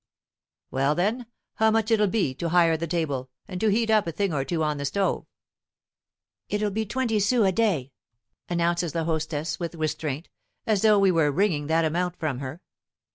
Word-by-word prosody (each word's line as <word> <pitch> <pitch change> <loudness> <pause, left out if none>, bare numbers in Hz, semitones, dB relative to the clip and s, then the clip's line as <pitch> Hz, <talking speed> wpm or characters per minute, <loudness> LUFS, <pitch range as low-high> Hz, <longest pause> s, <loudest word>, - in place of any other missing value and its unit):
"Well 135 +3 +1
then, 220 +8 -1 0.3
how 220 0 +4
much'll 220 0 +2
it 210 - +3
be, 190 -11 0
to 165 +5 -3
hire 165 -1 +4
the 165 +1 -3
table, 145 -6 -2 0.2
and 185 -2 -6
to 220 - +3
heat 225 +2 +2
up 215 -4 +3
a - - -1
thing 195 +2 -1
or 135 -2 0
two 160 +2 -1
on 150 -1 -1
the 140 - -2
stove?" 195 +7 -1 1.2
"It'll 210 0 0
be 220 +2 -2
twenty 235 -1 0
sous 215 +2 +3
a - - +3
day," 180 - 0 0.6
announces 170 -1 0
the 165 - -1
hostess 160 -1 -2
with 170 -1 -4
restraint, 155 -1 -3 0.4
as 210 -3 +1
though 215 -1 +5
we 195 -1 +4
were 165 -4 +3
wringing 155 -4 +1
that 160 +1 +2
amount 175 +2 -1
from 150 -6 -2
her. 140 +5 -6
170 Hz, 185 wpm, -25 LUFS, 155-210 Hz, 1.2 s, though